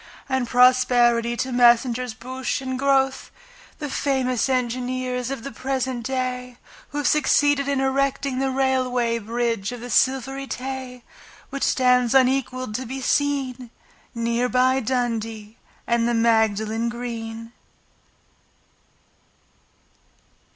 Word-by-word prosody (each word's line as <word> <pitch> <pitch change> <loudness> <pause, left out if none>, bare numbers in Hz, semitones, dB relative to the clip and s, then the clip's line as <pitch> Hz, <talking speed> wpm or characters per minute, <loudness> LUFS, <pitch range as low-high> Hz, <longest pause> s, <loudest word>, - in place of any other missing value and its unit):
And 265 -2 -1
prosperity 240 -1 +4
to 255 +3 -2
Messrs 245 0 +3
Bouche 260 +3 -4
and 260 -1 -4
Grothe, 270 -1 +1 0.5
The 295 - -5
famous 265 -2 0
engineers 250 0 -2
of 270 -4 -5
the 275 - -6
present 260 -2 -3
day, 250 -1 -3 0.3
Who 290 - -6
have 290 -3 0
succeeded 290 -1 +3
in 280 -1 0
erecting 270 0 0
The 270 0 0
Railway 255 -3 0
Bridge 230 -1 -2
of 245 - -7
the 245 +1 -7
Silvery 270 +3 +1
Tay, 255 -1 -6 0.5
Which 275 - -5
stands 250 -1 +3
unequalled 255 -2 +1
to 260 -1 -6
be 265 +3 -5
seen 265 -3 -1 0.5
Near 235 +1 0
by 255 +1 +3
Dundee 225 -3 -3 0.3
and 235 0 +1
the 240 - +1
Magdalen 220 0 +1
Green. 230 -1 -6
250 Hz, 115 wpm, -23 LUFS, 235-265 Hz, 0.5 s, prosperity